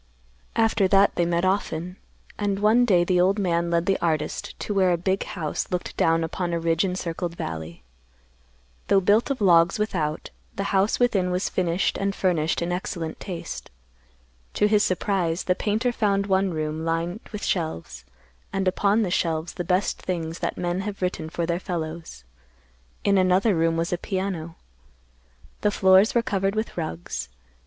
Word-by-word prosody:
After 225 -3 +3
that 195 +1 +4
they 175 - +1
met 170 +1 +1
often, 180 -2 -1 0.4
and 200 -1 0
one 215 +4 +4
day 180 -7 +4
the 180 0 +2
old 190 +3 +3
man 170 -3 0
led 170 0 +1
the 195 0 +1
artist 155 -3 -2
to 210 - -2
where 190 -2 +3
a 175 - +2
big 190 +3 0
house 170 -8 -3
looked 180 -1 -3
down 165 0 +2
upon 175 +2 -3
a 170 - 0
ridge 165 +1 +1
encircled 175 -2 -3
valley. 80 - -6 1.0
Though 195 - +5
built 205 +7 +3
of 275 -5 -2
logs 170 -2 +5
without, 165 -8 -2 0.2
the 195 - -2
house 195 +2 +2
within 205 -7 +2
was 180 +1 -1
finished 180 0 0
and 195 0 -1
furnished 165 -3 +1
in 170 - -2
excellent 170 -2 -4
taste. 180 -4 -6 0.9
To - - +3
his 210 -1 +3
surprise, 185 -2 0
the 180 - +2
painter 220 +6 0
found 200 -4 +1
one 190 0 +2
room 155 0 -3
lined 165 +4 -1
with 210 -1 -5
shelves, 160 - -3 0.5
and 195 -1 -1
upon 205 +4 +2
the 185 - -2
shelves 165 -2 -1
the 175 - -4
best 180 +3 0
things 165 -2 -3
that - - -3
men 175 +1 -1
have 195 -1 -4
written 180 -3 -2
for 170 +1 -2
their 170 +1 -1
fellows. 165 - -5 0.8
In 200 -1 +3
another 185 +3 +3
room 165 0 +1
was 170 +1 -1
a 175 - -1
piano. 185 -4 -3 1.1
The 210 - +3
floors 190 +2 +4
were 235 - +3
covered 195 -4 0
with 220 +1 -2
rugs. 85 - -4
180 Hz, 170 wpm, -24 LUFS, 165-200 Hz, 1.1 s, Though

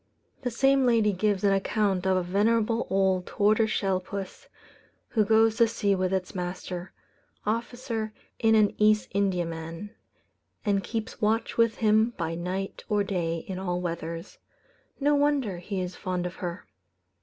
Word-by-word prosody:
The 250 - -1
same 270 +2 +3
lady 225 -3 +3
gives 200 +1 0
an 200 -1 +4
account 195 -1 +1
of 190 0 +3
a 185 - 0
venerable 220 +5 +1
old 190 -1 +1
tortoise 215 +2 +2
shell 195 -3 +1
puss, 195 0 -7 0.6
who 220 - +2
goes 220 +1 +4
to 235 -1 +5
sea 205 -3 +1
with 185 -1 0
its 190 -1 -2
master, 180 0 -5 0.5
officer 230 0 -2 0.3
in 225 -1 +4
an 210 -2 +4
East 215 0 +3
Indiaman, 175 -1 -2 0.7
and 200 -2 +1
keeps 225 +2 -5
watch 220 +2 +1
with 230 -1 +3
him 220 +2 +3
by 165 -1 -2
night 185 +3 -4
or 210 -1 +2
day 170 -4 -2
in 185 -1 -4
all 180 -2 -2
weathers. 165 -1 -5 0.6
No 290 +1 +3
wonder 285 -10 +1
he 190 +2 -4
is 180 0 -4
fond 180 -1 -3
of 180 - -5
her. 175 -2 -5
200 Hz, 155 wpm, -27 LUFS, 180-220 Hz, 0.7 s, to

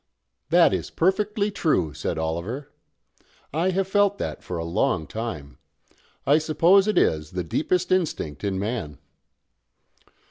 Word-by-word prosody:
"That 170 +1 +5
is - - -2
perfectly 205 +4 +1
true," 95 - 0
said - - -3
Oliver. 85 - -3 0.8
"I 165 +5 +1
have 190 +1 0
felt 205 0 +2
that - - -4
for 90 - -5
a 85 - -3
long 90 0 0
time. 90 -9 -6 0.7
I 145 +3 +5
suppose 170 +6 +4
it 215 - +1
is 75 0 +1
the 90 -1 -2
deepest 180 - -1
instinct 150 - -1
in 100 -2 -1
man." 100 - -3
140 Hz, 135 wpm, -24 LUFS, -, 0.8 s, That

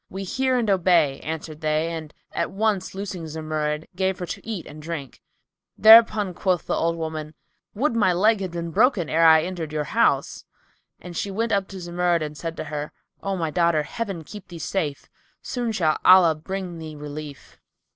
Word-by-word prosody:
"We 195 +1 -6
hear 260 +6 0
and 235 -3 0
obey," 170 -7 +3
answered 155 0 -6
they 155 +1 0
and 160 -2 -6 0.2
at - - -2
once 200 -2 -1
loosing 190 -4 -5
Zumurrud, 155 -1 -3
gave 190 0 0
her 180 - -4
to - - -7
eat 215 -6 -5
and 150 +1 -11
drink. 150 -5 -7 0.6
Thereupon 220 -3 +7
quoth 180 -1 0
the - - -1
old 165 0 0
woman, 155 -1 -5 0.4
"Would 250 +3 0
my 210 -5 +3
leg 210 +5 +3
had 190 - -2
been 170 -1 -5
broken, 205 - +2
ere 165 +1 +3
I 160 -1 +7
entered 170 -3 -5
your 155 -1 -1
house!" 145 - +1 0.6
And 175 0 -10
she 200 - -2
went 225 +4 -2
up 200 -2 +1
to 195 - -9
Zumurrud 175 -1 0
and 150 0 -6
said 165 +1 -6
to - - -3
her, 150 -1 -5 0.3
"O 195 -1 -2
my 165 -3 -2
daughter, 170 -2 +2
Heaven 195 -1 -5
keep 205 +5 -11
thee 175 - -9
safe; 160 -3 -3 0.4
soon 240 -2 -2
shall 160 -7 +1
Allah 185 -3 +7
bring 180 +2 -6
thee 155 -1 -8
relief." 150 -1 -9
170 Hz, 185 wpm, -24 LUFS, 155-195 Hz, 0.6 s, Thereupon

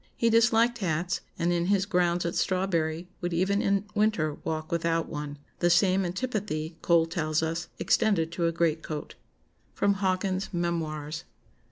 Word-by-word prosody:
He 230 -1 +2
disliked 230 +1 +4
hats, 175 -2 -1 0.2
and 175 0 +1
in 170 0 0
his 195 -1 +2
grounds 175 -3 +1
at 170 - -1
Strawberry 175 -3 0
would 175 -1 -2
even 195 +4 +2
in 200 0 +1
winter 205 -8 +1
walk 155 0 -3
without 165 -1 0
one. 145 -1 -5 0.2
The 175 - +3
same 190 +1 +4
antipathy, 180 -6 -3
Cole 170 -1 +4
tells 160 -2 -1
us, 165 +1 -2
extended 165 -7 +2
to 170 0 0
a - - +1
greatcoat." 160 -2 -2 0.6
[Sidenote: 200 0 +2
Hawkins's 190 0 -1
Memoirs. 160 -2 -2
175 Hz, 150 wpm, -28 LUFS, 160-195 Hz, 0.6 s, disliked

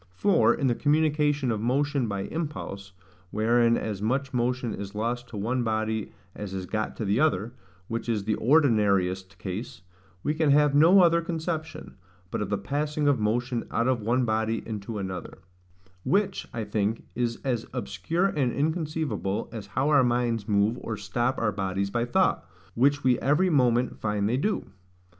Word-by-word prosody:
For, 200 - +4
in 140 - -1
the 125 - +3
communication 150 -1 +1
of 110 -2 -2
motion 135 +2 +1
by 100 -2 -2
impulse, 100 - -5 0.4
wherein 115 +3 +3
as 105 -3 -4
much 130 +5 -1
motion 125 -1 0
is 100 +1 -7
lost 120 +3 -2
to 110 - -8
one 120 +5 -1
body 110 -1 -1 0.2
as 100 -2 -6
is 95 -1 -4
got 110 +3 -3
to 110 - -4
the 100 +4 +1
other, 120 -7 +1 0.3
which 115 +1 -4
is 110 -3 0
the 110 +1 0
ordinariest 100 - +2
case, 90 +2 -6 0.4
we 150 - +1
can 155 -1 +1
have 145 0 +4
no 165 +7 +7
other 170 0 +4
conception, 160 - -4 0.3
but - - -2
of 105 - -2
the 105 - 0
passing 145 +8 -1
of 140 -4 +3
motion 120 +3 0
out 115 - 0
of 130 -3 +1
one 120 +4 +1
body 110 0 0
into 110 0 -5
another; 95 -2 -5 0.7
which, 195 -1 0
I 115 - -3
think, 105 +1 -1
is 120 -1 -1
as 120 -4 -1
obscure 125 - -1
and 140 -10 +1
inconceivable 155 - -2
as 110 -3 -7
how 135 +4 0
our 145 -3 +5
minds 120 -3 0
move 105 +3 +2
or 110 -2 -4
stop 120 +6 -1
our 110 -2 +1
bodies 95 0 -2
by 120 +2 0
thought, 120 - +2 0.3
which 140 +4 +2
we 125 -2 +3
every 150 +9 +2
moment 125 -4 +2
find 105 -1 0
they 120 +4 +1
do. 205 +10 -1
120 Hz, 170 wpm, -27 LUFS, 105-145 Hz, 0.7 s, no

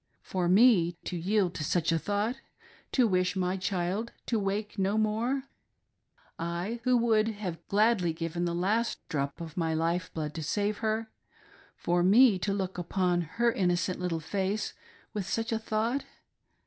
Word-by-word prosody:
For 180 -2 -1
me 190 -4 +5
to 180 - -4
yield 185 +1 +1
to 155 - -4
such 165 +2 +1
a 165 - +2
thought 205 +7 -1 0.3
— - - -27
to 250 -3 +4
wish 185 -1 +1
my 185 0 0
child 190 +4 -2
to 230 - 0
wake 205 +1 -2
no 195 +2 +1
more 225 +5 0 0.5
— - - -36 0.2
I, 220 +7 -3
who 255 -1 +4
would 220 -2 +3
have 205 -5 -3
given - - -32
gladly 205 -4 +3
the 170 +1 -2
last 215 +7 0
drop 140 -4 -2
of 165 -1 -8
my 165 -2 0
life 165 +3 0
blood 150 -2 -4
to 165 - -5
save 205 +6 -1
her 220 0 -1 0.3
— - - -27
for 175 0 +2
me 205 +2 +6
to 200 +3 -1
look 190 -2 -2
upon 175 0 +1 0.2
her 235 0 +4
innocent 180 -3 0
little 180 -2 -1
face 195 +5 -2 0.4
with 200 -3 -3
such 225 +1 -1
a 225 - 0
thought 225 +5 -1
195 Hz, 175 wpm, -29 LUFS, 175-220 Hz, 0.5 s, me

